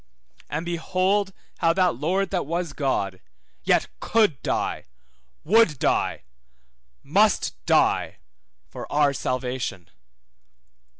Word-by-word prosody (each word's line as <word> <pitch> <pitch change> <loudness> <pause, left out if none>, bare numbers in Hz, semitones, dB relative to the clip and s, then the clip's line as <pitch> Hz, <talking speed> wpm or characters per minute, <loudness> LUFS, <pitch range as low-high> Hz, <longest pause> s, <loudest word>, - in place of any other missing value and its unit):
And 160 +3 -3
behold 185 +3 0 0.3
how 165 -1 +3
that 180 -1 +3
Lord 180 +9 -1
that 180 -7 -1
was 170 -1 -2
God, 100 -10 -1 0.4
yet - - +3
could 210 - +2
die, - - -2 0.6
would 205 -5 +4
die, - - 0 0.8
must 200 +8 +2
die - - +2 0.5
for 70 - -9
our 145 -1 +3
salvation. 125 -9 -3
165 Hz, 100 wpm, -24 LUFS, 135-190 Hz, 0.8 s, would